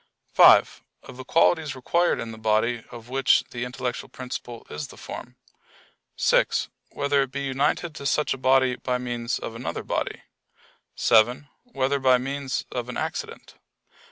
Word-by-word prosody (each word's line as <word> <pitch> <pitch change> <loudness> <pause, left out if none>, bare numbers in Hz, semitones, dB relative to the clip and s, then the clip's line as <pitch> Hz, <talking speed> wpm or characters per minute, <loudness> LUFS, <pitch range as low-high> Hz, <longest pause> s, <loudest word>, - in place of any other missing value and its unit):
(5) - - +6 0.2
Of 125 - -12
the 130 - -7
qualities 160 0 +2
required 170 +7 +1
in 115 - -5
the 110 - -10
body 110 +2 +1
of 115 -1 -11
which 135 +1 +3
the 120 0 -4
intellectual 125 0 -4
principle 125 -2 -7
is 75 -1 -6
the - - -14
form? - - -9 0.8
(6) - - +2 0.2
Whether 140 0 +1
it 135 -2 -2
be 140 +1 -4
united 140 +5 0
to 140 -2 -5
such 150 +2 +1
a - - -6
body 130 -1 +3
by 125 -1 -1
means 120 -1 -3
of - - -6
another 115 +2 -5
body? - - -3 0.7
(7) 120 +6 +3 0.2
Whether 140 - -1
by 130 -1 +5
means 135 0 -3
of 125 -1 -4
an 125 - -5
accident? - - -5
130 Hz, 155 wpm, -25 LUFS, 120-140 Hz, 0.8 s, 5